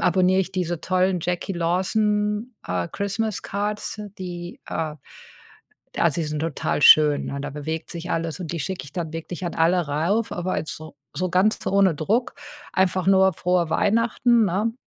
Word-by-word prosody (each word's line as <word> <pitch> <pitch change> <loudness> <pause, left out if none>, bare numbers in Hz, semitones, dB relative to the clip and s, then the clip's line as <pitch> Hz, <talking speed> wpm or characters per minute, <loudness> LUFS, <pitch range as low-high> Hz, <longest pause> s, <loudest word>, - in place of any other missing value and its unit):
abonniere 185 +1 +3
ich 190 0 -3
diese 175 -3 -2
tollen 185 0 +1
Jacquie 180 +3 -2
Lawson, 210 +6 0
äh, 90 -1 -2
Christmas 200 +1 -2
Cards, 210 +1 -3 0.2
die, 175 -1 -7
äh 155 -2 -2 1.0
d - - -2
Also, 170 -1 +2
die - - -3
sind 150 0 -3
total 160 -2 -1
schön, 150 -1 +7
ne? 140 - -4
Da 145 +1 -4
bewegt 155 +3 -5
sich 170 0 -6
alles 165 0 -2
und 170 -3 -5
die 165 - -3
schicke 190 -6 -4
ich 145 - -13
dann 170 -4 -4
wirklich 165 +3 -6
an 170 - -4
alle 170 +3 +3
rauf, 170 +10 0
aber 180 +1 -2
jetzt 155 - -5
so 155 -1 -11 0.2
so 185 0 -2
ganz 190 +5 +3
ohne 195 -3 +4
Druck, 215 - 0 0.4
einfach 185 0 +1
nur 190 0 +5
„Frohe 175 -1 +1
Weihnachten“, 230 +4 +3
ne? 200 +5 0
180 Hz, 175 wpm, -23 LUFS, 160-195 Hz, 1.0 s, schön